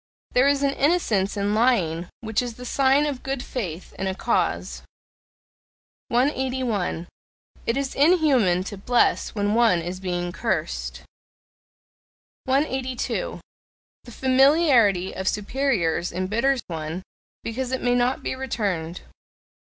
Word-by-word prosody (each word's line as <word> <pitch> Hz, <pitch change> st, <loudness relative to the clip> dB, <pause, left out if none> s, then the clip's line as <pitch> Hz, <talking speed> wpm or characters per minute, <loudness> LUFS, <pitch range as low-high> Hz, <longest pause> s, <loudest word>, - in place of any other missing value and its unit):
There 250 Hz, +2 st, +4 dB
is 285 Hz, 0 st, +2 dB
an 280 Hz, -, +3 dB
innocence 235 Hz, -, +1 dB
in 200 Hz, +1 st, 0 dB
lying 185 Hz, -8 st, +1 dB
which 220 Hz, -1 st, 0 dB
is 240 Hz, -2 st, -5 dB
the 250 Hz, -, -9 dB
sign 275 Hz, +3 st, +3 dB
of 280 Hz, -4 st, -3 dB
good 270 Hz, -1 st, -3 dB
faith 185 Hz, -8 st, -5 dB
in 190 Hz, -, -1 dB
a 190 Hz, -, -2 dB
cause. -, -, -1 dB, 1.3 s
181. 250 Hz, -, 0 dB, 0.6 s
It 230 Hz, -, +1 dB
is 275 Hz, -1 st, -2 dB
inhuman 275 Hz, -, +3 dB
to 200 Hz, 0 st, -7 dB
bless 245 Hz, +2 st, +1 dB
when 205 Hz, 0 st, 0 dB
one 230 Hz, -6 st, +4 dB
is 175 Hz, +2 st, -5 dB
being 175 Hz, -2 st, -2 dB
cursed. -, -, -3 dB, 1.4 s
182. 265 Hz, -, -1 dB, 0.6 s
The 240 Hz, -, -11 dB
familiarity 260 Hz, -, +4 dB
of 190 Hz, 0 st, -4 dB
superiors 210 Hz, -, 0 dB
embitters 225 Hz, +9 st, 0 dB
one, 160 Hz, +2 st, -5 dB, 0.4 s
because 250 Hz, +3 st, -3 dB
it 260 Hz, -, -2 dB
may 245 Hz, -, +2 dB
not 245 Hz, +1 st, +1 dB
be -, -, -2 dB
returned. 200 Hz, -10 st, -3 dB
235 Hz, 120 wpm, -24 LUFS, 190-265 Hz, 1.4 s, There